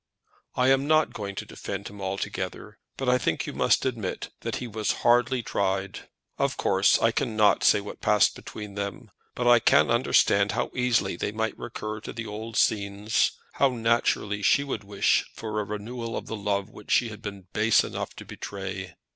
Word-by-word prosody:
"I 125 +1 +3
am 135 +1 +3
not 155 0 +3
going 100 -2 -5
to - - -5
defend - - -6
him 100 -1 -10
altogether, 95 +1 -4 0.2
but 135 - -3
I 125 0 +4
think - - -1
you - - -5
must - - +2
admit 115 -7 -3
that - - -3
he 125 - -4
was 110 -2 -2
hardly 120 +1 +3
tried. 95 -2 -2 0.3
Of - - 0
course 95 +1 +3
I 115 - +3
cannot 110 -2 +2
say 105 - +5
what 100 - -9
passed 105 -1 +4
between 105 -2 -8
them, 100 -2 -5 0.2
but 125 - -1
I 120 -1 +7
can 115 - +4
understand 105 -4 +3
how - - -1
easily 125 -7 +1
they - - -2
might 110 +1 -1
recur 110 -2 -6
to - - -8
the 115 -1 -5
old 110 +1 -6
scenes; 100 +1 +1 0.2
how 140 - +3
naturally 115 -3 0
she 140 +7 +4
would 130 -6 -4
wish 100 0 +2
for 110 -1 -3
a - - 0
renewal 115 +3 -5
of - - -5
the 110 - -5
love 100 0 -2
which 105 - -14
she 120 - +3
had 105 0 -10
been 100 -4 -7
base 110 +1 +4
enough - - -5
to - - -10
betray! 95 -1 -6
105 Hz, 190 wpm, -26 LUFS, 100-120 Hz, 0.3 s, I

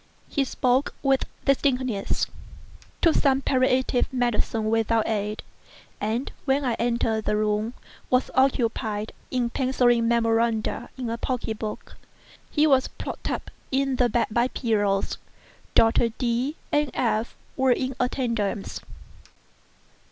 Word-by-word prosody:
He 280 - 0
spoke 255 +1 +1
with 270 -1 +3 0.2
distinctness—took 260 - -1
some 270 -2 +3
palliative 255 -1 +2
medicines 240 -3 0
without 225 0 +2
aid—and, 215 +2 -4
when 275 0 +2
I 245 - +1
entered 230 -2 0
the 210 - +1
room, 215 +2 0 0.3
was 255 0 +2
occupied 225 -5 +1 0.2
in 245 -2 0
penciling 245 -3 +2
memoranda 230 0 +1
in 255 -2 -3
a 230 - -3
pocket 230 -4 -2
book. 215 -1 -6 0.5
He 300 0 +3
was 270 -4 +4
propped - - -6
up - - -4 0.2
in 270 -1 +1
the 245 -1 +3
bed 235 +1 +2
by 235 +3 +2
pillows. 205 -6 0 0.6
Doctors 225 0 +4
D—— 250 +4 0 0.2
and 295 -1 +2
F—— 225 -2 0 0.2
were 265 -1 +3
in 255 +1 0
attendance. 230 -6 -1
240 Hz, 115 wpm, -25 LUFS, 225-260 Hz, 0.6 s, was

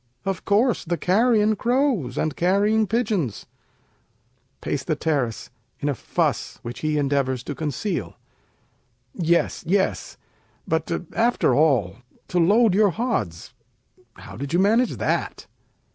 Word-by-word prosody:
Of 195 -3 -3
course, 220 +4 +2
the 175 +1 -2
carrion 215 +3 +3
crows 240 - 0
and 155 - -1
carrying 205 +4 +2
pigeons. 210 - -1 1.1
Peis. 145 - -2 1.0
[in - - -1
a - - +1
fuss, - - -2
which 120 +1 -7
he 155 -1 -1
endeavors 135 -3 0
to 145 - -5
conceal] 160 - -3 1.0
Yes! 170 -1 0
yes! 170 - 0 0.5
but 160 0 -1 0.3
after 235 +3 +2
all, 125 - +2 0.3
to 180 - +1
load 210 +5 +4
your 205 +1 +4
hods, 200 - -3 0.6
How - - -12
did 140 +3 -6
you - - +3
manage 225 +6 +2
that? - - -2
180 Hz, 115 wpm, -23 LUFS, 145-220 Hz, 1.1 s, load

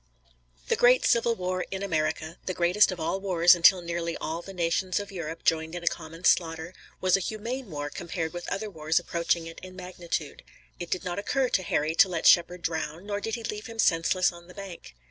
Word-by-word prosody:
The - - +2
great 250 +1 +5
Civil 235 0 +3
War 185 -1 -2
in 195 0 -4
America, 160 -2 -2
the 185 - -2
greatest 180 +4 +4
of 180 - -6
all 190 +4 -2
wars 175 -2 +5
until 175 +1 +5
nearly 170 0 -3
all 165 +2 -4
the 195 - -10
nations 180 +1 0
of 205 -1 -7
Europe 165 -3 -6
joined 160 +1 +1
in 175 - -6
a - - -6
common 165 +1 -3
slaughter, 165 0 +2 0.3
was 185 -1 +3
a - - +1
humane 230 +5 -4
war 145 -2 -5
compared 165 0 -4
with 175 0 -6
other 215 +2 -2
wars 160 -4 -1
approaching 170 -1 0
it 165 0 -9
in 185 0 -10
magnitude. 175 -4 -5 0.4
It 175 -1 -6
did 185 - -2
not 180 +2 -2
occur 260 +5 0
to 190 - +1
Harry 155 -3 0
to 190 +3 +5
let 170 -2 -3
Shepard 175 0 +5
drown, 160 +1 -3
nor 205 0 -3
did 225 +1 -2
he 230 - -7
leave 210 0 -5
him 230 -1 -9
senseless 180 -1 +3
on 170 0 -14
the 180 - -14
bank. 195 - -9
175 Hz, 215 wpm, -27 LUFS, 165-195 Hz, 0.4 s, great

